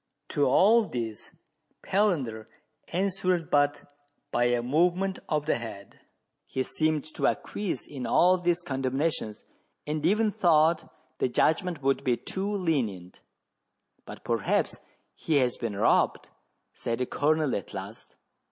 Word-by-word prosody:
To 145 Hz, -, +2 dB
all 215 Hz, -, +5 dB
this 115 Hz, -, -5 dB, 0.5 s
Palander 145 Hz, -, 0 dB, 0.4 s
answered 185 Hz, -2 st, -1 dB
but 145 Hz, 0 st, +2 dB, 0.5 s
by 120 Hz, -, +2 dB
a 120 Hz, -1 st, +1 dB
movement 180 Hz, +8 st, +1 dB
of 150 Hz, -1 st, 0 dB
the 155 Hz, -, +1 dB
head: 100 Hz, -4 st, -9 dB, 0.5 s
he 130 Hz, -, -2 dB
seemed 155 Hz, +1 st, 0 dB
to -, -, +1 dB
acquiesce 205 Hz, -4 st, -2 dB
in 135 Hz, -4 st, -6 dB
all 185 Hz, +1 st, +4 dB
these 175 Hz, 0 st, 0 dB
condemnations, 135 Hz, -4 st, -2 dB, 0.4 s
and 150 Hz, 0 st, -3 dB
even 210 Hz, +5 st, +3 dB
thought 165 Hz, -5 st, +3 dB, 0.3 s
the -, -, +1 dB
judgment 165 Hz, +3 st, +1 dB
would 135 Hz, 0 st, +1 dB
be 125 Hz, -2 st, +1 dB
too 195 Hz, +2 st, -4 dB
lenient. 130 Hz, -, -2 dB, 0.8 s
"But -, -, -11 dB
perhaps -, -, 0 dB, 0.3 s
he 160 Hz, -, -2 dB
has' 125 Hz, -3 st, +2 dB
been 115 Hz, -4 st, -3 dB
robbed," 100 Hz, -, +2 dB, 0.4 s
said 115 Hz, 0 st, -3 dB
the 125 Hz, -, -1 dB
Colonel 150 Hz, +1 st, +1 dB
at 100 Hz, -, -5 dB
last. -, -, -9 dB
150 Hz, 130 wpm, -27 LUFS, 125-180 Hz, 0.8 s, all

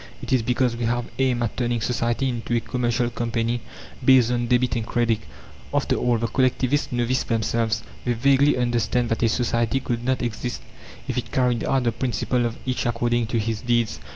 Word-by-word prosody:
_ -, -, -14 dB, 0.2 s
It -, -, -2 dB
is 130 Hz, -, +4 dB
because 125 Hz, +1 st, +1 dB
we 120 Hz, 0 st, -3 dB
have 120 Hz, +1 st, -1 dB
aimed 125 Hz, -3 st, +2 dB
at 115 Hz, -, -2 dB
turning 120 Hz, -1 st, 0 dB
society 120 Hz, +3 st, 0 dB
into 120 Hz, -1 st, -2 dB
a -, -, +3 dB
commercial 120 Hz, 0 st, -1 dB
company 115 Hz, 0 st, -1 dB, 0.4 s
based 130 Hz, -3 st, +6 dB
on 120 Hz, -1 st, 0 dB
debit 125 Hz, 0 st, +2 dB
and 115 Hz, -, -1 dB
credit. 115 Hz, -1 st, +1 dB, 0.5 s
After -, -, +1 dB
all, 120 Hz, -1 st, +1 dB
the 115 Hz, -, -1 dB
Collectivists 130 Hz, +3 st, +1 dB
know 120 Hz, -1 st, 0 dB
this 130 Hz, +2 st, +1 dB
themselves. 115 Hz, -1 st, 0 dB, 0.2 s
They 120 Hz, -, +1 dB
vaguely 135 Hz, +4 st, +3 dB
understand 120 Hz, 0 st, 0 dB
that 115 Hz, -, -1 dB
a 115 Hz, -, +3 dB
society 120 Hz, +1 st, +1 dB
could 120 Hz, -2 st, -3 dB
not 130 Hz, 0 st, 0 dB
exist 120 Hz, +1 st, -4 dB, 0.4 s
if -, -, -1 dB
it -, -, -7 dB
carried 125 Hz, -3 st, +1 dB
out 135 Hz, -2 st, +1 dB
the 120 Hz, -, +2 dB
principle 120 Hz, +1 st, 0 dB
of 115 Hz, -, -6 dB
"Each 125 Hz, -1 st, -1 dB
according 120 Hz, 0 st, 0 dB
to 115 Hz, -, -1 dB
his 110 Hz, 0 st, -1 dB
deeds." 120 Hz, -2 st, 0 dB
120 Hz, 200 wpm, -23 LUFS, 115-125 Hz, 0.5 s, based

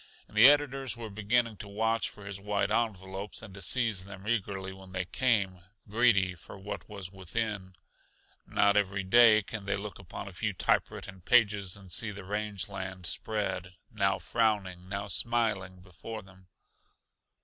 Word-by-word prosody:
And -, -, -18 dB
the 115 Hz, +5 st, +10 dB
editors 135 Hz, -4 st, +2 dB
were 115 Hz, -2 st, -7 dB
beginning 110 Hz, +2 st, +1 dB
to 100 Hz, -, -8 dB
watch 110 Hz, +3 st, 0 dB
for 105 Hz, -, -12 dB
his 100 Hz, -1 st, -6 dB
white 100 Hz, 0 st, 0 dB
envelopes 100 Hz, -3 st, -2 dB
and 95 Hz, -, -10 dB
to 100 Hz, -, -9 dB
seize 110 Hz, -2 st, +1 dB
them 100 Hz, +1 st, -10 dB
eagerly 95 Hz, -4 st, -1 dB
when 95 Hz, -1 st, -13 dB
they 95 Hz, 0 st, -1 dB
came, 100 Hz, -5 st, +1 dB, 0.3 s
greedy 105 Hz, -4 st, +3 dB
for 90 Hz, -, -12 dB
what 100 Hz, +3 st, -7 dB
was 100 Hz, -3 st, -7 dB
within. 95 Hz, 0 st, -3 dB, 0.7 s
Not 100 Hz, 0 st, +3 dB
every 100 Hz, -1 st, +1 dB
day 110 Hz, +1 st, +7 dB
can 105 Hz, 0 st, -5 dB
they 100 Hz, -, +1 dB
look 105 Hz, 0 st, -7 dB
upon 95 Hz, +1 st, -8 dB
a -, -, -7 dB
few 105 Hz, +3 st, -2 dB
typewritten 95 Hz, +1 st, -1 dB
pages 100 Hz, -3 st, +3 dB
and 95 Hz, -3 st, -13 dB
see 110 Hz, +5 st, +1 dB
the 100 Hz, -1 st, -7 dB
range 105 Hz, -1 st, -2 dB
land 95 Hz, -2 st, -6 dB
spread, 95 Hz, -2 st, -2 dB, 0.2 s
now 100 Hz, -3 st, +2 dB
frowning, 95 Hz, -6 st, 0 dB
now 100 Hz, 0 st, -3 dB
smiling, 100 Hz, -5 st, 0 dB
before 100 Hz, +4 st, -8 dB
them. 95 Hz, -1 st, -19 dB
100 Hz, 160 wpm, -30 LUFS, 95-110 Hz, 0.7 s, the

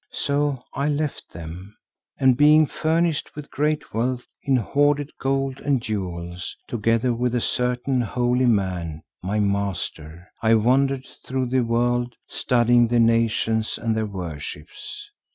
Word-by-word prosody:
So 145 Hz, -1 st, 0 dB, 0.2 s
I 140 Hz, +2 st, 0 dB
left 150 Hz, 0 st, -2 dB
them, 85 Hz, +5 st, -9 dB, 0.4 s
and 130 Hz, -2 st, +4 dB
being 150 Hz, +3 st, +6 dB
furnished 160 Hz, +1 st, 0 dB
with 150 Hz, -1 st, -9 dB
great 150 Hz, +2 st, -1 dB
wealth 125 Hz, +2 st, -1 dB, 0.2 s
in 135 Hz, -, +2 dB
hoarded 145 Hz, +4 st, +1 dB
gold 135 Hz, 0 st, -1 dB
and 140 Hz, -3 st, +1 dB
jewels, 90 Hz, -5 st, -4 dB
together 115 Hz, +2 st, +1 dB
with 125 Hz, +1 st, 0 dB
a -, -, +2 dB
certain 125 Hz, +2 st, 0 dB
holy 125 Hz, +2 st, +1 dB
man, 90 Hz, -8 st, 0 dB, 0.2 s
my 100 Hz, +4 st, -1 dB
master, 95 Hz, -5 st, -2 dB
I 115 Hz, 0 st, +4 dB
wandered 130 Hz, +4 st, +2 dB, 0.2 s
through 130 Hz, -1 st, -2 dB
the 130 Hz, 0 st, +2 dB
world, 120 Hz, +1 st, 0 dB
studying 120 Hz, -1 st, +3 dB
the 120 Hz, +1 st, +2 dB
nations 115 Hz, -1 st, +2 dB
and 115 Hz, -1 st, -1 dB
their 110 Hz, -1 st, -1 dB
worships. 85 Hz, -, -7 dB
120 Hz, 135 wpm, -23 LUFS, 105-135 Hz, 0.4 s, being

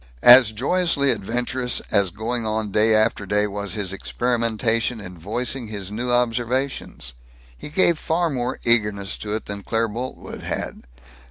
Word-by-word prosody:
As 120 Hz, -2 st, +9 dB
joyously 140 Hz, +4 st, +1 dB
adventurous 125 Hz, +4 st, -2 dB
as 100 Hz, -2 st, +3 dB
going 115 Hz, +6 st, -3 dB
on 110 Hz, -1 st, -2 dB
day 110 Hz, +2 st, +4 dB
after 110 Hz, -2 st, +2 dB
day 105 Hz, +1 st, +2 dB
was 100 Hz, 0 st, -3 dB
his 100 Hz, -3 st, -2 dB
experimentation 115 Hz, +1 st, -1 dB
in 90 Hz, -3 st, -9 dB
voicing 115 Hz, +8 st, -3 dB
his 100 Hz, -2 st, -6 dB
new 120 Hz, +4 st, -3 dB
observations. 120 Hz, -, -1 dB, 0.4 s
He 60 Hz, -, -9 dB
gave 170 Hz, 0 st, +3 dB
far 165 Hz, 0 st, 0 dB
more 125 Hz, -1 st, -2 dB
eagerness 105 Hz, -4 st, +2 dB
to 105 Hz, -1 st, -4 dB
it 110 Hz, -, -3 dB
than 100 Hz, 0 st, -6 dB
Claire 115 Hz, +3 st, 0 dB
Boltwood 125 Hz, +5 st, -7 dB
had. -, -, -5 dB
115 Hz, 150 wpm, -22 LUFS, 105-125 Hz, 0.4 s, As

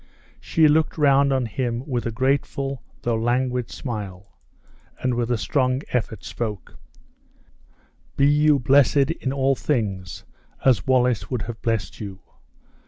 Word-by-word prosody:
She 160 Hz, -1 st, +3 dB
looked 155 Hz, +2 st, +2 dB
round 140 Hz, -2 st, +4 dB
on 130 Hz, -2 st, +1 dB
him 120 Hz, +2 st, -3 dB
with 120 Hz, -4 st, -2 dB
a -, -, -2 dB
grateful 135 Hz, +2 st, -1 dB, 0.2 s
though 120 Hz, -1 st, 0 dB
languid 125 Hz, +1 st, 0 dB
smile, 100 Hz, -, -7 dB, 0.6 s
and 130 Hz, -1 st, 0 dB
with 120 Hz, 0 st, -1 dB
a 120 Hz, -, +1 dB
strong 130 Hz, +6 st, 0 dB
effort 110 Hz, -5 st, -2 dB
spoke: 105 Hz, -4 st, -6 dB, 1.4 s
"Be 140 Hz, -, +4 dB
you 150 Hz, +1 st, +4 dB
blessed 140 Hz, +2 st, +4 dB
in 130 Hz, -5 st, -3 dB
all 135 Hz, 0 st, +2 dB
things 100 Hz, -, -3 dB, 0.4 s
as 130 Hz, 0 st, +3 dB
Wallace 125 Hz, -3 st, +2 dB
would 125 Hz, -5 st, -2 dB
have 115 Hz, -1 st, -7 dB
blessed 115 Hz, -3 st, -2 dB
you! 100 Hz, -3 st, -7 dB
125 Hz, 135 wpm, -23 LUFS, 115-135 Hz, 1.4 s, round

